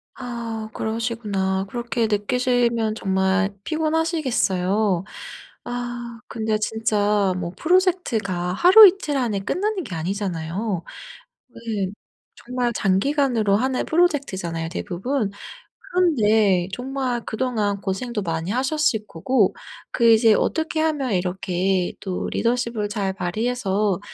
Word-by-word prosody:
아 235 Hz, -3 st, -5 dB
그러시구나. 215 Hz, -4 st, -2 dB
그렇게 235 Hz, 0 st, -1 dB
느끼시면 235 Hz, +1 st, +1 dB
정말 195 Hz, 0 st, +1 dB
피곤하시겠어요. 245 Hz, -, 0 dB, 0.6 s
아 240 Hz, -1 st, -5 dB
근데 220 Hz, -1 st, -1 dB
진짜 210 Hz, -3 st, +1 dB
뭐 175 Hz, -1 st, -4 dB
프로젝트가 235 Hz, -, +1 dB
하루이틀 370 Hz, -, +7 dB
안에 225 Hz, -7 st, 0 dB
끝나는 380 Hz, -, -2 dB
게 190 Hz, -, -7 dB
아니잖아요. 180 Hz, +1 st, -3 dB, 0.6 s
네. 225 Hz, -5 st, -3 dB, 0.6 s
정말 245 Hz, 0 st, -1 dB
장기간으로 220 Hz, +1 st, +2 dB
하는 255 Hz, +3 st, 0 dB
프로젝트잖아요 190 Hz, -, 0 dB
대부분. 205 Hz, +5 st, -2 dB, 0.6 s
그런데 215 Hz, -, +3 dB
정말 255 Hz, 0 st, -2 dB
그동안 215 Hz, -4 st, -1 dB
고생도 210 Hz, +3 st, -3 dB
많이 165 Hz, 0 st, -3 dB
하셨을 260 Hz, -4 st, 0 dB
거고 205 Hz, +6 st, +1 dB, 0.4 s
그 235 Hz, -2 st, +3 dB
이제 225 Hz, 0 st, +6 dB
'어떻게 320 Hz, -1 st, 0 dB
하면 295 Hz, -7 st, 0 dB
이렇게 185 Hz, 0 st, 0 dB
또 185 Hz, -2 st, -3 dB
리더십을 235 Hz, -3 st, -1 dB
잘 200 Hz, -2 st, -2 dB
발휘해서 200 Hz, 0 st, -1 dB
220 Hz, 265 characters per minute, -22 LUFS, 195-250 Hz, 0.6 s, 하루이틀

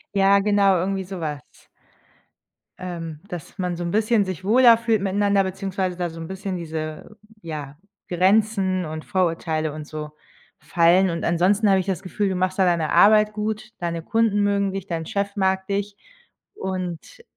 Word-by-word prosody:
Ja, 195 Hz, 0 st, +5 dB
genau, 200 Hz, -1 st, +3 dB
irgendwie 190 Hz, +2 st, -1 dB
sowas. 165 Hz, -7 st, -5 dB, 1.4 s
Ähm, 165 Hz, -4 st, -6 dB
dass 175 Hz, -2 st, -8 dB
man 180 Hz, -1 st, -1 dB
so 175 Hz, -, -4 dB
'n 170 Hz, -, -3 dB
bisschen 215 Hz, 0 st, +2 dB
sich 185 Hz, -2 st, -6 dB
wohler 235 Hz, +3 st, +6 dB
fühlt 225 Hz, -3 st, 0 dB
miteinander, 200 Hz, 0 st, +2 dB
beziehungsweise 190 Hz, -1 st, -3 dB
da 175 Hz, -1 st, -2 dB
so 165 Hz, 0 st, -10 dB
'n 165 Hz, -, -6 dB
bisschen 190 Hz, 0 st, -5 dB
diese, 160 Hz, +4 st, -6 dB, 0.2 s
ja, 150 Hz, -4 st, -7 dB, 0.3 s
Grenzen 190 Hz, 0 st, +2 dB
und 155 Hz, 0 st, -6 dB
Vorurteile 165 Hz, -5 st, -1 dB
und 155 Hz, -1 st, -7 dB
so 150 Hz, -1 st, -7 dB, 0.5 s
fallen. 175 Hz, +2 st, +3 dB
Und 170 Hz, 0 st, -3 dB
ansonsten 195 Hz, +5 st, +2 dB
habe 195 Hz, -, +4 dB
ich 185 Hz, -, -2 dB
das 190 Hz, -3 st, -2 dB
Gefühl, 200 Hz, +1 st, -2 dB
du 190 Hz, -, -2 dB
machst 185 Hz, +1 st, -1 dB
da 190 Hz, -, +5 dB
deine 170 Hz, -3 st, +1 dB
Arbeit 210 Hz, +4 st, +5 dB
gut, 215 Hz, +1 st, -4 dB
deine 170 Hz, -1 st, -3 dB
Kunden 225 Hz, +3 st, +1 dB
mögen 200 Hz, -1 st, +1 dB
dich, 195 Hz, -1 st, -5 dB
dein 165 Hz, -2 st, -3 dB
Chef 200 Hz, +3 st, -3 dB
mag 190 Hz, -1 st, 0 dB
dich 200 Hz, 0 st, -2 dB, 0.6 s
und 185 Hz, -, -5 dB
190 Hz, 165 wpm, -23 LUFS, 170-200 Hz, 1.4 s, wohler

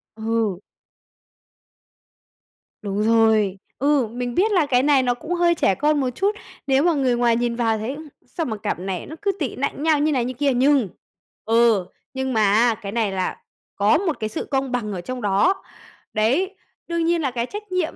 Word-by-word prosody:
Ừ. 220 Hz, -4 st, -1 dB, 2.2 s
Đúng 205 Hz, 0 st, -2 dB
rồi. 220 Hz, -3 st, +3 dB, 0.2 s
Ừ, 280 Hz, -4 st, +2 dB
mình 245 Hz, +1 st, -5 dB
biết 425 Hz, +4 st, +2 dB
là 350 Hz, -6 st, +3 dB
cái 255 Hz, -2 st, +2 dB
này 280 Hz, -3 st, +4 dB
nó 245 Hz, -1 st, +2 dB
cũng 315 Hz, +8 st, -5 dB
hơi 345 Hz, -1 st, +3 dB
trẻ 195 Hz, -, +2 dB
con 295 Hz, +1 st, +1 dB
một 260 Hz, -2 st, 0 dB
chút, 395 Hz, -, -1 dB, 0.3 s
nếu 270 Hz, +2 st, +3 dB
mà 345 Hz, -1 st, +3 dB
người 260 Hz, -4 st, +1 dB
ngoài 240 Hz, -1 st, +2 dB
nhìn 240 Hz, 0 st, -1 dB
vào 225 Hz, -2 st, +1 dB
thấy: 235 Hz, +6 st, -4 dB, 0.3 s
"Sao 330 Hz, -3 st, -4 dB
mà 220 Hz, -3 st, -3 dB
cặp 190 Hz, -, -3 dB
này 185 Hz, -1 st, -4 dB
nó 315 Hz, -, -9 dB
cứ 400 Hz, -1 st, +1 dB
tị 285 Hz, -, -2 dB
nạnh 280 Hz, +2 st, -3 dB
nhau 315 Hz, -2 st, +3 dB
như 305 Hz, +1 st, +2 dB
này 250 Hz, -4 st, +1 dB
như 255 Hz, -, -3 dB
kia?" 275 Hz, +1 st, +1 dB
Nhưng, 265 Hz, -2 st, +3 dB, 0.6 s
ừ, 225 Hz, -4 st, +3 dB, 0.3 s
nhưng 265 Hz, -1 st, -2 dB
mà, 220 Hz, -, +2 dB
a, 230 Hz, +1 st, +4 dB
cái 200 Hz, -1 st, -5 dB
này 220 Hz, -3 st, 0 dB
là 185 Hz, -1 st, -2 dB, 0.4 s
có 205 Hz, +10 st, +3 dB
một 340 Hz, -4 st, -2 dB
cái 215 Hz, -1 st, -2 dB
sự -, -, -4 dB
công 270 Hz, -1 st, 0 dB
bằng 225 Hz, -4 st, -2 dB
ở 180 Hz, -, -4 dB
trong 255 Hz, +6 st, -6 dB
đó. 205 Hz, -, +2 dB, 0.5 s
Đấy. 280 Hz, -, +1 dB, 0.3 s
Đương 335 Hz, -1 st, -1 dB
nhiên 340 Hz, -1 st, +1 dB
là 270 Hz, -3 st, -1 dB
cái 235 Hz, -1 st, -2 dB
trách 415 Hz, +4 st, -9 dB
nhiệm, 365 Hz, -3 st, -1 dB
250 Hz, 200 wpm, -22 LUFS, 220-300 Hz, 2.2 s, này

